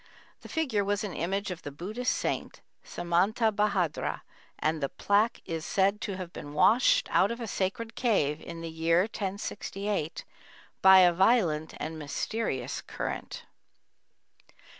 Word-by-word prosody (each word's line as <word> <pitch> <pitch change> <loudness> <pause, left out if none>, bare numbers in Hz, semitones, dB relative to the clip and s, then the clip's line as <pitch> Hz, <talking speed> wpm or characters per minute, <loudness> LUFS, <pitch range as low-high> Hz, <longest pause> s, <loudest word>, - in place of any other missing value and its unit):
The - - -12
figure 255 -11 0
was 205 +1 -1
an 200 -4 -4
image 195 +5 -2
of 180 - -6
the - - -6
Buddhist 210 - -2
saint, - - -3 0.2
Samantabahadra, 195 0 0 0.3
and 155 0 -1
the 140 - 0
plaque 210 +3 +1
is 165 -3 -4
said 195 +4 +1
to 200 -4 -3
have 180 -2 -7
been 145 0 -8
washed 255 - +4
out - - +4
of 235 - -4
a 235 - -4
sacred 215 +3 -2
cave 155 - +1
in 165 - -8
the 165 -1 -5
year 165 +2 +2
1068, 200 -3 -3 0.6
by 190 0 +9
a 175 -1 +6
violent 175 -5 +2
and 160 +1 -5
mysterious 150 - -3
current. - - -5
190 Hz, 140 wpm, -29 LUFS, 165-210 Hz, 0.6 s, by